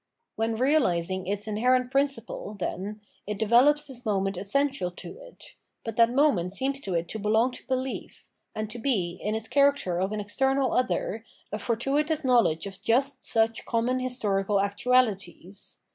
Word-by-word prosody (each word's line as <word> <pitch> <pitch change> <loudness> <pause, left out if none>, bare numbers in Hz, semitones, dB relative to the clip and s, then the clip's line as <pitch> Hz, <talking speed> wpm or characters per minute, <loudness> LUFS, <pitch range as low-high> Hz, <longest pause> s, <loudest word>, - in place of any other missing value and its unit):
When 225 0 -1
reahsing 190 - +1
its 205 +1 -3
inherent 250 +4 +2
principle, 270 -6 -1
then, 205 +3 -4 0.3
it 210 -1 -3
develops 255 +8 +4
this 260 -4 -11
moment 195 -2 0
essential 205 +2 0
to 390 - -10
it; - - -14 0.3
but 225 -2 -5
that 230 0 +6
moment 240 - +2
seems 270 +5 -2
to 190 -7 -3
it 170 0 -1
to 220 - -4
belong 220 +4 +2
to - - -10
behef, 260 0 -4 0.3
and 215 0 -2
to 240 - -6
be, 185 -9 -1
in 210 +1 -1
its 220 0 -4
character 280 -11 +2
of 190 +2 0
an 215 - -2
external 265 +6 +1
other, 250 -3 0 0.3
a 210 - -3
fortuitous 285 +8 0
knowledge 230 -11 +3
of 195 -2 -8
just 270 +5 +1
such 225 0 +1
common 240 +2 0
historical 210 -6 -1
actuaUties. 200 -3 0
225 Hz, 160 wpm, -27 LUFS, 200-260 Hz, 0.3 s, that